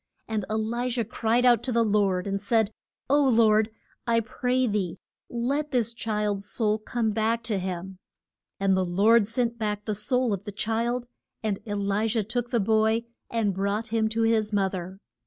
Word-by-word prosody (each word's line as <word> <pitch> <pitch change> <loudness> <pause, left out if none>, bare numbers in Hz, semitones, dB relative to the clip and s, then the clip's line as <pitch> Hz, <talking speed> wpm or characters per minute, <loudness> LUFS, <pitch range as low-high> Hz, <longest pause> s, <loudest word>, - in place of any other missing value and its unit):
And 215 -3 -2
E 215 - -1
li 235 +3 -1
jah 240 -1 0
cried 240 +1 +2
to 260 - -2
the 235 -1 +3
Lord, 200 -4 +1
and 200 0 -2
said, 220 0 +2 0.4
O 285 +2 +4
Lord, 220 -4 +4 0.4
I 230 -1 +4
pray 250 +3 0
thee 195 -6 -1 0.3
let 275 +6 -1
this 235 -4 0
child's 210 -3 -2
soul 215 -2 0
come 220 0 -1
back 225 +2 0
to 220 -4 -1
him. 185 0 -5 0.6
And 195 -1 +3
the 190 - +2
Lord 200 +5 +4
sent 235 0 -1
back 210 -1 -2
the 215 - -1
soul 250 +2 0
of 195 -1 -4
the 205 - -6
child, 230 +4 -1 0.4
and 210 -3 -1
E 205 - -2
li 200 +2 0
jah 225 0 0
took 240 +3 -3
the 240 - +1
boy 220 +2 +2 0.3
and 220 -4 0
brought 200 +4 -1
him 220 -1 +1
to 225 +1 0
his 220 -1 +2
moth 195 -2 +1
er. 185 +1 -5
220 Hz, 185 wpm, -26 LUFS, 205-235 Hz, 0.6 s, O